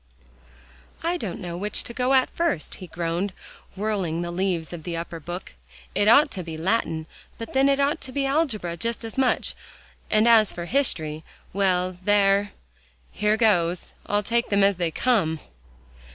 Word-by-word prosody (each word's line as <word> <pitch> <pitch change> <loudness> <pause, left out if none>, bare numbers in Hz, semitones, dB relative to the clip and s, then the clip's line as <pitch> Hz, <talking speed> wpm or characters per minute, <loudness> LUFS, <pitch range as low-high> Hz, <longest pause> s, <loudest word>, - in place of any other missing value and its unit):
"I 340 +2 +1
don't 205 - -4
know 175 -3 -5
which 205 +4 0
to 235 - -6
go 255 +2 +2
at 260 - +3
first," 335 - -1
he 185 - -7
groaned, 175 +3 -2 0.4
whirling 190 -5 -1
the 175 - -4
leaves 175 -2 -1
of 170 - -6
the 170 +1 -4
upper 165 0 -5
book. 175 +4 -7 0.4
"It 205 - +2
ought 285 +7 +6
to 185 - -4
be 160 -1 -6
Latin 165 -3 0 0.3
but 230 -1 -7
then 270 +1 +4
it 275 0 +2
ought 285 +4 +1
to 260 - -6
be 275 +1 -1
algebra 255 - 0
just 230 +6 -3
as 225 - -6
much, 265 -2 +1 0.6
and 215 +2 +4
as 225 -3 +6
for 175 - -5
history 160 - -1 0.3
well 185 -1 +1
there 200 0 +3 0.6
here 210 +1 +1
goes, 180 -6 +2
I'll 205 0 +1
take 235 +3 0
them 200 -1 +3
as 195 -2 +3
they 175 -2 0
come." 165 -4 +1
200 Hz, 170 wpm, -25 LUFS, 175-235 Hz, 0.6 s, ought